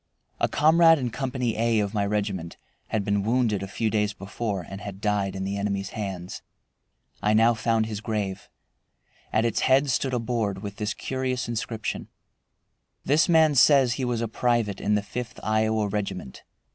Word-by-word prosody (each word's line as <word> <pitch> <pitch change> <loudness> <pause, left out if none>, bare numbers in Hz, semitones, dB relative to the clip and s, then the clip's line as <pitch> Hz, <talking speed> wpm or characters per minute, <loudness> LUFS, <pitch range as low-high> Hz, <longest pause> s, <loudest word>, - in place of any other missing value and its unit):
A - - +2
comrade 165 +2 +5
in 125 -4 -2
Company 125 -1 -2
A 115 0 +2
of 100 0 -1
my 105 -2 +1
regiment 100 -4 -2 0.3
had 105 -3 -1
been 100 0 +1
wounded 115 -1 +1
a 100 - -4
few 110 +3 -1
days 105 -1 +1
before 100 -2 -4
and 95 +1 -8
had 100 -2 -7
died 100 -2 0
in 95 - -3
the 100 +1 -2
enemy's 100 -1 -2
hands. 95 -5 -5 0.8
I 105 +1 +2
now 115 +2 +5
found 115 -1 +1
his 110 -1 -5
grave. 105 -4 -3 0.8
At 110 +1 +2
its 115 - 0
head 135 +1 +3
stood 130 0 0
a - - 0
board 110 -4 -2
with 100 0 -6
this 105 0 -2
curious 130 -1 -2
inscription: 115 -1 -3 1.0
"This 150 +6 +3
man 160 -2 +5
says 135 -2 +5
he 130 - -3
was 120 -2 -1
a 115 - -1
private 115 -3 0
in 105 - +2
the 105 - 0
Fifth 125 +3 -6
Iowa 110 0 +1
Regiment. 100 -9 -4
110 Hz, 175 wpm, -25 LUFS, 100-125 Hz, 1.0 s, comrade